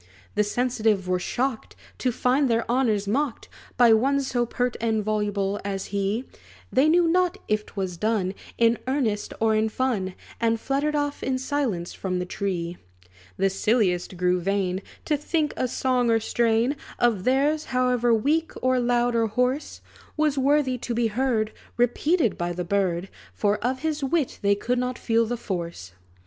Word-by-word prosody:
The 210 - +2
sensitive 220 -3 0
were 180 0 +1
shocked, 250 +4 -2 0.2
To 255 - +1
find 255 +3 +2
their 230 0 +1
honors 230 -5 +1
mocked 265 +3 -1 0.3
By 240 -2 +7
one 270 +5 +3
so 245 -3 -1
pert 245 0 -1
and 220 -2 +1
voluble 205 -1 -1
as 195 -1 -3
he; 200 +5 0 0.5
They 275 +4 +4
knew 345 +1 +4
not 360 +2 +2
if 215 0 0
't - - -16
was 190 -3 -3
done 210 -2 0 0.2
In 230 0 +3
earnest 245 -7 0
or 220 0 +3
in 220 +1 +2
fun; 215 -6 -1 0.2
And 230 -1 +1
fluttered 280 +5 0
off 290 -1 -1
in 260 0 0
silence 255 -10 -2
from 185 -1 -3
the 180 - -2
tree. 175 -2 -3 0.6
The 195 - +2
silliest 190 -4 +1
grew 180 0 +2
vain, 190 0 -1 0.2
To 305 - +2
think 300 +1 -1
a 255 - 0
song 250 -1 +1
or 225 0 +4
strain 230 +4 +1 0.2
Of 225 -6 +2
theirs, 285 +5 +2
however 250 -2 +1
weak, 295 +9 +1
or 255 0 +2
loud, 240 0 +2
or 230 -1 +2
hoarse, 250 +6 -1 0.4
Was 305 -2 +2
worthy 270 -2 +2
to 240 0 -3
be 235 0 +2
heard 220 -2 0 0.3
Repeated 245 - +2
by 175 0 -1
the 180 0 -4
bird; 185 -1 0 0.3
For 205 0 +1
of 255 +2 -1
his 310 -2 -1
wit 280 0 0
they 200 -1 +3
could 245 +4 -1
not 250 0 -2
feel 230 -1 +1
the 240 +1 -2
force. 170 - -5
235 Hz, 170 wpm, -25 LUFS, 200-260 Hz, 0.6 s, By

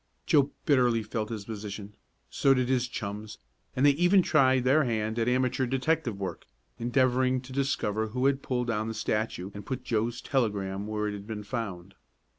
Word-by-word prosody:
Joe 145 -3 +4 0.2
bitterly 125 -6 +3
felt 110 0 -3
his 110 -3 -5
position. 105 -1 -7 0.4
So 135 -1 +4
did 125 -1 0
his 125 -2 +2
chums, 105 -1 -6 0.4
and 130 - +3
they 145 - +8
even 175 +6 +4
tried 130 -6 +4
their 140 +5 +4
hand 110 -2 -1
at 115 +1 +2
amateur 130 +1 +1
detective 130 -3 0
work, 95 -1 -5 0.3
endeavoring 130 +1 +2
to 130 0 -11
discover 110 -6 0
who 125 +4 -2
had 140 0 +2
pulled 125 -2 -1
down 110 -2 -1
the 115 - -4
statue 105 -4 -2
and 105 - -8
put 130 - -4
Joe's 115 +1 -1
telegram 100 -6 -1
where 105 0 -1
it 105 - -3
had 100 0 -8
been 110 -2 -5
found. 95 -5 -5
120 Hz, 180 wpm, -28 LUFS, 105-130 Hz, 0.4 s, they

